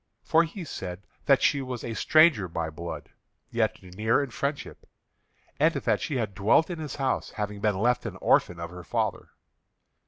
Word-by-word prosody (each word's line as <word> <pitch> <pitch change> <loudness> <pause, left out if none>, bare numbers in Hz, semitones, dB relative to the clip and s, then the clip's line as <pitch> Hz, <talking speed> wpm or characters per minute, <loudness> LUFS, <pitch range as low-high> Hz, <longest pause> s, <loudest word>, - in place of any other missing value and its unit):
For 165 +1 +4
he 175 +3 -7
said 95 - -7 0.2
that 140 -2 +5
she 140 -1 +3
was 130 -2 -5
a 115 - -4
stranger 155 - +4
by 80 -1 -3
blood, 85 +2 -7 0.4
yet - - 0
near 110 +9 +1
in 135 - -6
friendship, 140 +4 -4 0.7
and - - +4
that - - 0
she 145 - -2
had 110 -5 -1
dwelt 105 - +3
in 170 - -5
his 150 -3 -5
house, 135 -2 -1
having 105 -1 -5
been 105 -2 +1
left 120 +4 +1
an - - -6
orphan 85 -1 +2
of 85 0 -6
her 90 0 -9
father. - - -2
115 Hz, 180 wpm, -27 LUFS, 95-140 Hz, 0.7 s, that